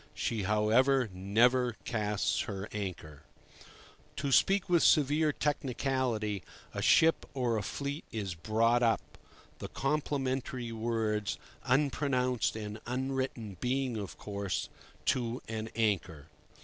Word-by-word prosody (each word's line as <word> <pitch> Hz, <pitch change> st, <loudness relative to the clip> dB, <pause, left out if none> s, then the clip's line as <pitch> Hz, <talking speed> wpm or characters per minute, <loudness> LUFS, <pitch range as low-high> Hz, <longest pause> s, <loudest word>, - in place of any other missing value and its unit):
She, 110 Hz, -2 st, -1 dB
however, 110 Hz, +5 st, +3 dB
never 120 Hz, +6 st, +3 dB
"casts" 105 Hz, -3 st, 0 dB
her 100 Hz, 0 st, -4 dB
anchor. 85 Hz, -8 st, -5 dB, 0.9 s
To 140 Hz, -1 st, -2 dB
speak 195 Hz, +8 st, +4 dB
with 175 Hz, -3 st, +4 dB
severe 150 Hz, +1 st, +4 dB
technicality, 130 Hz, -7 st, -1 dB, 0.3 s
a -, -, -3 dB
ship 165 Hz, 0 st, +5 dB
or 125 Hz, -3 st, +1 dB
a 110 Hz, -, 0 dB
fleet 140 Hz, +9 st, -4 dB
is 100 Hz, -5 st, -3 dB
"brought 115 Hz, +7 st, +2 dB
up"—the 115 Hz, -2 st, -3 dB
complementary 135 Hz, -4 st, -2 dB
words 110 Hz, -2 st, -1 dB, 0.3 s
unpronounced 130 Hz, -3 st, +1 dB
and 110 Hz, 0 st, -6 dB
unwritten 130 Hz, -5 st, -2 dB
being, 130 Hz, 0 st, 0 dB
of 95 Hz, -8 st, -5 dB
course, 100 Hz, -2 st, -3 dB, 0.4 s
"to 120 Hz, -1 st, 0 dB
an 110 Hz, 0 st, -4 dB
anchor." 90 Hz, -9 st, -1 dB
115 Hz, 110 wpm, -31 LUFS, 105-135 Hz, 0.9 s, ship